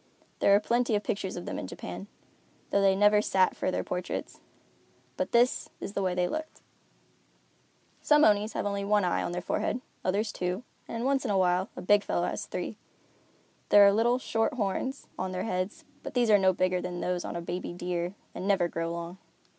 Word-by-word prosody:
There 200 - +5
are - - +5
plenty 235 +1 +1
of 205 - 0
pictures 195 -2 -3
of 175 - -6
them - - -4
in - - -5
Japan, 90 +2 -7 0.6
though 200 - +3
they 195 -1 +4
never 205 +1 +5
sat 190 -2 +2
for - - -1
their - - -1
portraits, 180 0 -4 0.8
but - - -2
this 240 +1 +3
is 200 - -6
the 200 - -1
way 185 -2 0
they 180 0 +1
looked. 315 - -5 1.4
Some 300 0 +5
Onis 210 +1 +3
have - - -2
only 200 -1 -1
one 205 -1 +2
eye 175 - +1
in - - -3
their 175 0 -4
forehead, 245 - -1 0.2
others 205 +3 0
two, 180 +5 -3 0.2
and, 230 +1 -4
once 270 0 +2
in 250 - -2
a 200 - +2
while, 185 +1 +2
a - - -7
big 205 +2 +4
fellow - - 0
has - - -4
three. - - -4 0.9
There 205 -1 +8
are 200 - +6
little, 235 +3 +3
short 225 -2 -1
horns 250 +5 -2
on 185 0 -2
their 185 0 -2
heads, 185 -1 -3 0.2
but - - -8
these 240 -3 +3
are 205 - +7
no 190 -1 +4
bigger 185 0 0
than 175 -1 -4
those 180 0 -1
on - - -5
a - - -2
baby 175 +1 -4
deer 175 +1 -3 0.2
and 185 - -5
never 195 -4 +3
grow 165 0 -3
long. 170 +2 -6
195 Hz, 205 wpm, -29 LUFS, 180-210 Hz, 1.4 s, There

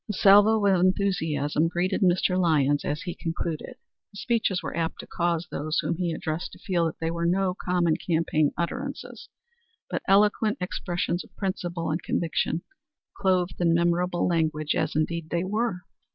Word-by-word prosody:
A - - -1
salvo 205 +2 +5
of 190 -2 +4
enthusiasm 165 -5 +1
greeted 175 +5 -1
Mr. 180 0 +3
Lyons 150 -5 +2
as 150 +6 -3
he 175 -3 -4
concluded. 165 -1 -4 0.3
His 200 - -9
speeches 225 -6 0
were - - -5
apt 165 -1 -2
to - - -11
cause 170 -1 -1
those 155 +2 -2
whom 165 +1 0
he 175 -2 -1
addressed 160 +1 -4
to - - -11
feel 175 -4 0
that 160 - -6
they 165 0 -1
were 170 0 -1
no 185 +1 +1
common 180 -3 0
campaign 160 -3 +1
utterances, 170 - -5 0.6
but - - -1
eloquent 210 +2 +3
expressions 175 -1 -2
of - - -21
principle 175 -4 -3
and 160 - -1
conviction, 165 0 -1 0.5
clothed 185 -2 0
in 170 -1 +3
memorable 175 +1 +1
language, 155 -3 0
as, - - -1
indeed, 160 +1 -1
they 170 0 0
were. 210 -1 -1
175 Hz, 165 wpm, -26 LUFS, 165-185 Hz, 0.6 s, salvo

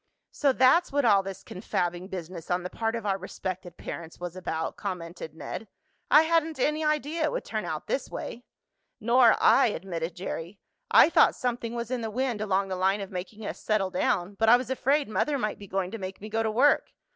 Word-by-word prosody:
"So 285 -2 +2
that's 260 +7 +4
what 285 -1 +1
all 205 -4 +5
this 195 0 -8
confabbing 175 -1 -3
business 175 -3 -7
on 180 0 0
the 180 - -5
part 225 0 -1
of 230 - -5
our 195 -1 0
respected 185 -1 -6
parents 165 -1 -8
was 175 0 -6
about," 165 -3 -3
commented 170 -5 -6
Ned. 215 +6 -6 0.4
"I 300 +2 +7
hadn't 320 -2 +1
any 305 +4 +1
idea 305 +1 0
it - - 0
would - - -3
turn - - -3
out - - -4
this - - -2
way." 240 - -6 0.6
"Nor 235 0 +5
I," 270 - +5
admitted 170 -4 -4
Jerry. 180 +1 -6 0.3
"I 335 - +7
thought - - +5
something 240 -1 -3
was 235 0 -4
in 255 -2 -1
the 225 - -3
wind 245 -1 -2
along 195 -2 0
the 190 - -2
line 190 +2 +1
of 195 - -7
making 200 +4 -6
us - - -5
settle 205 -3 0
down, 180 +1 0
but 225 0 +4
I 240 - +8
was 255 0 -5
afraid 275 +3 +1
mother 285 +7 0
might 215 -5 -2
be 200 - -10
going 190 -1 -2
to 225 - -6
make 190 0 -6
me 215 - -8
go 225 +1 0
to 220 - 0
work. 255 +7 +3
210 Hz, 215 wpm, -27 LUFS, 185-255 Hz, 0.6 s, I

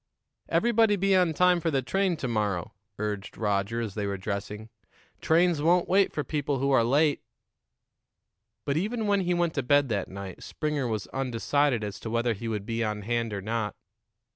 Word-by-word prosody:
"Everybody 225 -3 +3
be 195 0 +2
on 180 -3 +4
time 180 +1 +4
for 165 - -1
the 135 -4 0
train 190 +4 0
to 130 - -3
morrow," 105 -6 -1 0.2
urged 105 -1 -4
Roger, 105 +2 0
as 110 -4 -4
they 105 -1 -2
were 100 0 -2
dressing. 105 +2 -5 0.5
"Trains 170 -1 +3
won't 175 +3 +3
wait 195 +1 +3
for 150 - -2
people 145 -2 -1
who 140 +2 0
are 130 -4 +5
late." 145 +5 +2 1.4
But 140 +1 0
even 220 +6 -1
when 200 -1 +2
he 180 -1 0
went 175 -2 +1
to 140 - 0
bed 140 +1 +3
that 100 -4 -1
night 95 -1 -8
Springer 150 -4 -2
was 110 -3 -2
undecided 135 0 0
as 100 -2 -5
to 115 - -6
whether 115 +1 +1
he 115 +3 -6
would 105 -3 -3
be 115 +1 -1
on 105 -1 -3
hand 115 +1 -1
or 100 -2 -4
not. 110 0 -2
125 Hz, 190 wpm, -27 LUFS, 105-165 Hz, 1.4 s, are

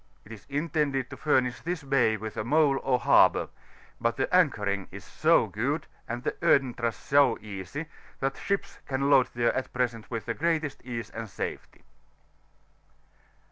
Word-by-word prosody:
It 110 - -14
is 110 -3 -11
intended 145 -3 -1
to - - -6
Aimish 130 -4 +1
this 170 -2 -3
bay 130 -5 +2
with 110 0 -7
a - - -2
mole 145 +2 +3
or 130 -2 +2
harbour; - - +4 0.5
but 115 0 0
the 135 +6 0
anchoring 105 - +2
is - - -10
so - - +3
good, - - -2 0.2
and 120 +1 -4
the - - -4
entrance 120 -4 +2
so 140 -4 +3
easy, 105 - -6 0.3
that 135 0 -1
ships 200 0 -3
can 140 +1 0
load 130 -3 +6
there 120 0 +2
at 130 - -3
present 120 -3 -2
with 115 -3 -4
the 115 - -2
greatest 160 0 -1
ease 120 -2 -5
and 110 -1 -6
safety. - - -6
130 Hz, 160 wpm, -28 LUFS, 115-145 Hz, 0.5 s, load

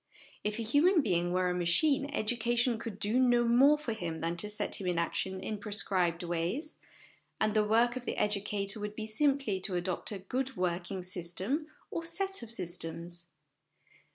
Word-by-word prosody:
If 210 +1 -1
a 230 - -2
human 300 - +4
being 175 -4 +1
were 185 0 +2
a 180 - +1
machine, 275 - +3
education 240 -1 +1
could 220 -4 -6
do 210 +5 +1
no 245 -2 +4
more 260 +6 +6
for 295 -6 -3
him 170 -7 -4
than 165 +2 -1
to 210 +4 -1
set 210 -1 -1
him 185 - -3
in 175 -1 0
action 190 +3 -1
in 210 +2 -4
prescribed 185 -5 0
ways, 175 - -2 0.6
and 215 -1 +2
the 215 -1 +4
work 230 +3 +3
of 255 -1 -5
the - - -3
educator 205 0 0
would 210 0 -5
be 220 - -4
simply 270 -3 +1
to 185 0 -2
adopt 180 +3 -2
a 205 - -3
good 255 +7 -3
working 180 +1 -2
system 185 - -2 0.2
or 335 - -3
set 385 +4 -1
of 235 - -8
systems. 170 -3 -4
210 Hz, 180 wpm, -31 LUFS, 180-245 Hz, 0.6 s, more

